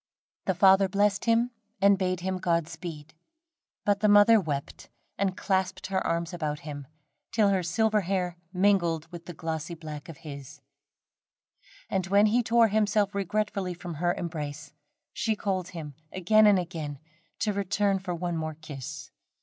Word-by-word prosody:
The 190 Hz, -, +2 dB
father 190 Hz, +1 st, +5 dB
blessed 205 Hz, +1 st, +1 dB
him, 230 Hz, +1 st, +3 dB, 0.3 s
and 200 Hz, +1 st, +6 dB
bade 185 Hz, -2 st, -1 dB
him 185 Hz, 0 st, -2 dB
Godspeed, 165 Hz, -3 st, -3 dB, 0.7 s
but 205 Hz, -1 st, +2 dB
the 215 Hz, -, +3 dB
mother 205 Hz, +2 st, +7 dB
wept 145 Hz, -5 st, -5 dB, 0.3 s
and 195 Hz, -1 st, -1 dB
clasped 190 Hz, -1 st, -1 dB
her 190 Hz, 0 st, -1 dB
arms 170 Hz, +1 st, -1 dB
about 155 Hz, -3 st, -3 dB
him, 145 Hz, -2 st, -7 dB, 0.4 s
till 215 Hz, -3 st, +3 dB
her 190 Hz, -2 st, +2 dB
silver 210 Hz, +5 st, +1 dB
hair 180 Hz, -2 st, -1 dB, 0.2 s
mingled 180 Hz, -4 st, +2 dB
with 170 Hz, -1 st, -10 dB
the 175 Hz, -, -6 dB
glossy 160 Hz, +1 st, -4 dB
black 155 Hz, -1 st, -8 dB
of 160 Hz, -, -9 dB
his; 140 Hz, -3 st, -9 dB, 1.3 s
and 190 Hz, -1 st, -1 dB
when 200 Hz, +2 st, +5 dB
he 225 Hz, +3 st, +3 dB
tore 230 Hz, -1 st, +4 dB
himself 210 Hz, -1 st, +2 dB
regretfully 200 Hz, -2 st, -1 dB
from 175 Hz, 0 st, -7 dB
her 175 Hz, 0 st, +2 dB
embrace, 155 Hz, -3 st, -5 dB, 0.4 s
she 220 Hz, -1 st, 0 dB
called 190 Hz, -3 st, -2 dB
him 160 Hz, -5 st, -7 dB, 0.2 s
again 215 Hz, +4 st, +4 dB
and 205 Hz, -2 st, +6 dB
again 165 Hz, -5 st, -4 dB, 0.4 s
to 210 Hz, -, +1 dB
return 200 Hz, 0 st, +1 dB
for 180 Hz, -2 st, -4 dB
one 175 Hz, 0 st, -3 dB
more 155 Hz, -1 st, -3 dB
kiss. 150 Hz, -4 st, -8 dB
185 Hz, 155 wpm, -28 LUFS, 165-200 Hz, 1.3 s, mother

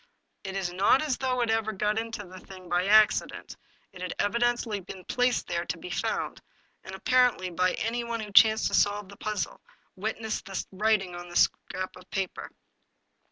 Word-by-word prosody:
It 190 Hz, 0 st, -5 dB
is 185 Hz, -2 st, -2 dB
not 200 Hz, +10 st, +4 dB
as 290 Hz, -5 st, 0 dB
though 255 Hz, -1 st, 0 dB
it 235 Hz, -, 0 dB
had 220 Hz, -2 st, 0 dB
got 210 Hz, +2 st, +1 dB
into 225 Hz, -2 st, -5 dB
the 185 Hz, +1 st, -11 dB
thing 185 Hz, -1 st, -12 dB
by 175 Hz, +2 st, +1 dB
accident, 215 Hz, +1 st, +3 dB, 0.4 s
it 185 Hz, -, -11 dB
had 180 Hz, -1 st, -4 dB
evidently 235 Hz, -1 st, 0 dB
been 185 Hz, 0 st, -10 dB
placed 245 Hz, 0 st, +1 dB
there -, -, -2 dB
to -, -, -3 dB
be -, -, -8 dB
found, -, -, -2 dB, 0.4 s
and, 190 Hz, -, -8 dB
apparently, 245 Hz, -4 st, +2 dB
by 180 Hz, +2 st, +1 dB
anyone 235 Hz, +1 st, -2 dB
who 210 Hz, -2 st, -6 dB
chanced 220 Hz, +2 st, +6 dB
to -, -, -9 dB
solve 205 Hz, -1 st, +2 dB
the 200 Hz, -, -12 dB
puzzle; 210 Hz, -7 st, -3 dB, 0.3 s
witness 220 Hz, +2 st, -3 dB
the 195 Hz, -3 st, -5 dB
writing 195 Hz, -2 st, +1 dB
on 175 Hz, 0 st, -8 dB
the 175 Hz, -, -10 dB
scrap 185 Hz, +1 st, 0 dB
of 180 Hz, -, -15 dB
paper." 195 Hz, -1 st, -3 dB
205 Hz, 180 wpm, -28 LUFS, 185-225 Hz, 0.4 s, chanced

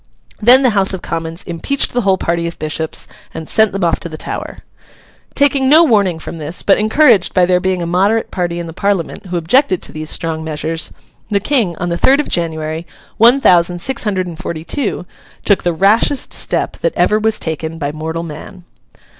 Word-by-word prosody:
Then 250 Hz, +5 st, +6 dB
the 250 Hz, -, +4 dB
House 195 Hz, -2 st, +2 dB
of 185 Hz, -, -10 dB
Commons 165 Hz, +1 st, -5 dB
impeached 180 Hz, +12 st, -1 dB
the 245 Hz, -, +1 dB
whole 195 Hz, -3 st, +2 dB
party 170 Hz, -1 st, -1 dB
of 170 Hz, -, -7 dB
Bishops 155 Hz, +1 st, -3 dB, 0.3 s
and 160 Hz, -, -6 dB
sent 220 Hz, -2 st, +3 dB
them 195 Hz, 0 st, -3 dB
off 170 Hz, -1 st, +1 dB
to 170 Hz, -, -7 dB
the 155 Hz, -, -8 dB
Tower: -, -, -6 dB, 0.7 s
Taking 275 Hz, -2 st, +2 dB
no 315 Hz, +4 st, +7 dB
warning 200 Hz, -, +2 dB
from 165 Hz, +1 st, -8 dB
this; 155 Hz, +3 st, -3 dB
but 195 Hz, -, +3 dB
encouraged 220 Hz, -, +3 dB
by 180 Hz, -, +5 dB
there 180 Hz, 0 st, +2 dB
being 185 Hz, -1 st, -1 dB
a -, -, -2 dB
moderate 195 Hz, +6 st, +1 dB
party 175 Hz, -2 st, -2 dB
in 170 Hz, -, -4 dB
the 165 Hz, -, -8 dB
Parliament 195 Hz, -1 st, -2 dB
who 180 Hz, 0 st, -3 dB
objected 185 Hz, -, +2 dB
to -, -, -4 dB
these 155 Hz, 0 st, -6 dB
strong 160 Hz, -1 st, -2 dB
measures, 160 Hz, +1 st, -3 dB, 0.4 s
the 205 Hz, -2 st, +1 dB
King, 215 Hz, -, 0 dB
on 175 Hz, -, -3 dB
the 170 Hz, 0 st, -2 dB
third 275 Hz, +2 st, +4 dB
of 300 Hz, -, -1 dB
January, 160 Hz, -1 st, -3 dB, 0.3 s
one 240 Hz, +5 st, +6 dB
thousand 175 Hz, -6 st, +3 dB
six 265 Hz, +9 st, -1 dB
hundred 195 Hz, -4 st, -1 dB
and 170 Hz, -3 st, -8 dB
forty 160 Hz, -2 st, -5 dB
two, 220 Hz, -, -3 dB, 0.4 s
took 200 Hz, -, +3 dB
the 175 Hz, -, 0 dB
rashest 210 Hz, -, +2 dB
step -, -, -1 dB
that -, -, -2 dB
ever 215 Hz, -, +2 dB
was 220 Hz, 0 st, +1 dB
taken 160 Hz, 0 st, -4 dB
by 145 Hz, -2 st, -3 dB
mortal 160 Hz, +2 st, -5 dB
man. 175 Hz, +4 st, -10 dB
180 Hz, 205 wpm, -15 LUFS, 165-215 Hz, 0.7 s, no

